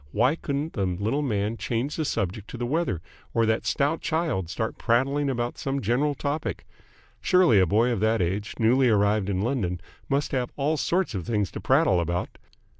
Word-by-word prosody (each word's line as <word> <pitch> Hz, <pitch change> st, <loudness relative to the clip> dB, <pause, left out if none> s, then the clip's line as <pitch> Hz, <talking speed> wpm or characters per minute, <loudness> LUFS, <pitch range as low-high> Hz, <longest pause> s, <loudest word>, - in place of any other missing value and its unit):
Why 125 Hz, -, +2 dB
couldn't 145 Hz, 0 st, -3 dB
the 100 Hz, -4 st, 0 dB
little 105 Hz, +10 st, -1 dB
man 110 Hz, -4 st, -1 dB
change 120 Hz, +6 st, -2 dB
the 160 Hz, -, -1 dB
subject 100 Hz, -2 st, -2 dB
to -, -, -7 dB
the 120 Hz, -, -2 dB
weather, 140 Hz, -, -1 dB, 0.3 s
or 115 Hz, -, +3 dB
that 110 Hz, 0 st, 0 dB
stout 145 Hz, +4 st, +1 dB
child 155 Hz, -, -1 dB
start 110 Hz, +6 st, -3 dB
prattling 135 Hz, +4 st, +1 dB
about 120 Hz, -2 st, -2 dB
some 135 Hz, 0 st, -2 dB
general 135 Hz, +6 st, +1 dB
topic? 145 Hz, +3 st, -3 dB, 0.6 s
Surely 180 Hz, -, +5 dB
a 95 Hz, -, +4 dB
boy 115 Hz, +7 st, +3 dB
of 115 Hz, -, -1 dB
that 110 Hz, +2 st, +2 dB
age, 95 Hz, +4 st, -2 dB
newly 125 Hz, +3 st, +4 dB
arrived 105 Hz, -1 st, +2 dB
in 95 Hz, 0 st, 0 dB
London, 105 Hz, -8 st, -1 dB, 0.3 s
must 140 Hz, +1 st, 0 dB
have 125 Hz, -3 st, -1 dB
all 150 Hz, +3 st, 0 dB
sorts 175 Hz, 0 st, 0 dB
of 95 Hz, -5 st, -4 dB
things 105 Hz, -5 st, 0 dB
to -, -, -7 dB
prattle 135 Hz, -, +3 dB
about? 85 Hz, +1 st, -3 dB
120 Hz, 190 wpm, -26 LUFS, 100-140 Hz, 0.6 s, Surely